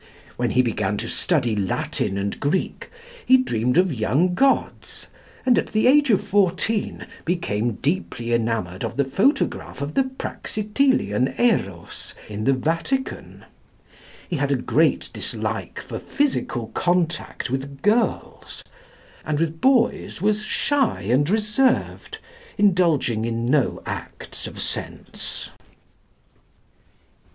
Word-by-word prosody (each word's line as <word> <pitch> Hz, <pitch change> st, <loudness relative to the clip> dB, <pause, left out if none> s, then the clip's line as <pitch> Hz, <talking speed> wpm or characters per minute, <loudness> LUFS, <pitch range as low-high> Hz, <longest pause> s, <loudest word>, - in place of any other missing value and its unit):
When 120 Hz, -1 st, 0 dB
he 130 Hz, -, +3 dB
began 105 Hz, -3 st, -1 dB
to 115 Hz, -, -4 dB
study 125 Hz, -6 st, 0 dB
Latin 95 Hz, 0 st, -1 dB
and 100 Hz, 0 st, -3 dB
Greek, 150 Hz, +6 st, -1 dB, 0.3 s
he 260 Hz, -, +6 dB
dreamed 125 Hz, -, 0 dB
of 180 Hz, -3 st, +4 dB
young 130 Hz, -, +1 dB
gods, 270 Hz, +8 st, 0 dB, 0.4 s
and 250 Hz, -2 st, +5 dB
at -, -, -2 dB
the 215 Hz, -, +2 dB
age 285 Hz, +2 st, +5 dB
of 210 Hz, -, +3 dB
fourteen, 200 Hz, +2 st, 0 dB, 0.2 s
became 120 Hz, -, -1 dB
deeply 130 Hz, -, -2 dB
enamoured 110 Hz, -6 st, -1 dB
of 115 Hz, +1 st, -4 dB
the 140 Hz, -, +2 dB
photograph 260 Hz, -, 0 dB
of 140 Hz, +1 st, -4 dB
the 270 Hz, -, +2 dB
Praxitelian 215 Hz, -, 0 dB
Erôs 100 Hz, -, -1 dB
in 105 Hz, 0 st, -5 dB
the 135 Hz, -, +4 dB
Vatican. 165 Hz, -, -2 dB, 0.8 s
He -, -, -2 dB
had -, -, 0 dB
a -, -, +4 dB
great -, -, +1 dB
dislike -, -, -3 dB
for -, -, -6 dB
physical 195 Hz, -, -1 dB
contact 170 Hz, -6 st, -1 dB
with 135 Hz, +1 st, -4 dB
girls; 220 Hz, +3 st, 0 dB, 0.6 s
and 150 Hz, -1 st, -1 dB
with 160 Hz, 0 st, -1 dB
boys 240 Hz, -6 st, +2 dB
was 210 Hz, +2 st, +1 dB
shy 265 Hz, -, 0 dB
and 125 Hz, -, +2 dB
reserved, 215 Hz, +5 st, +1 dB, 0.4 s
indulging 170 Hz, -, +3 dB
in 115 Hz, 0 st, -2 dB
no 135 Hz, +1 st, +1 dB
acts -, -, -6 dB
of -, -, -9 dB
sense. -, -, -5 dB
160 Hz, 120 wpm, -23 LUFS, -, 0.8 s, he